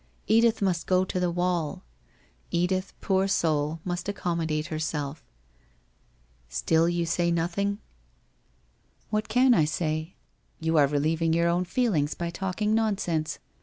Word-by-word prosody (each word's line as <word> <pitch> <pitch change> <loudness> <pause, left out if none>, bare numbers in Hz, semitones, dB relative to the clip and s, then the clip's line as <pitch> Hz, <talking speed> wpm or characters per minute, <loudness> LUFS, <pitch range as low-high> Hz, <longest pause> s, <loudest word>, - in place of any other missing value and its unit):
Edith 225 -1 +3
must 180 -3 0
go 185 0 +3
to 185 - -2
the 180 -1 +1
wall. 175 -3 -1 0.7
Edith, 185 +2 0
poor 190 0 +2
soul, 155 -4 0
must 175 +1 -3
ac 205 - -3
commodate 160 -4 -1
herself... 155 -1 -3 1.3
Still 160 - +2
you 175 -1 0
say 170 +1 +1
nothing?' 175 +4 0
1 - - -29 1.3
What 215 0 -1
can 250 +3 +5
I 160 -8 +4
say? 155 +1 -2 0.4
You 160 0 0
are 145 -2 +6
relieving 155 +3 +1
your 170 +1 +3
own 175 +1 +1
feel 235 +4 +1
ings 145 -2 0
by 170 0 -3
talking 195 +4 -1
nonsense. 195 -8 0
170 Hz, 140 wpm, -27 LUFS, 160-190 Hz, 1.3 s, are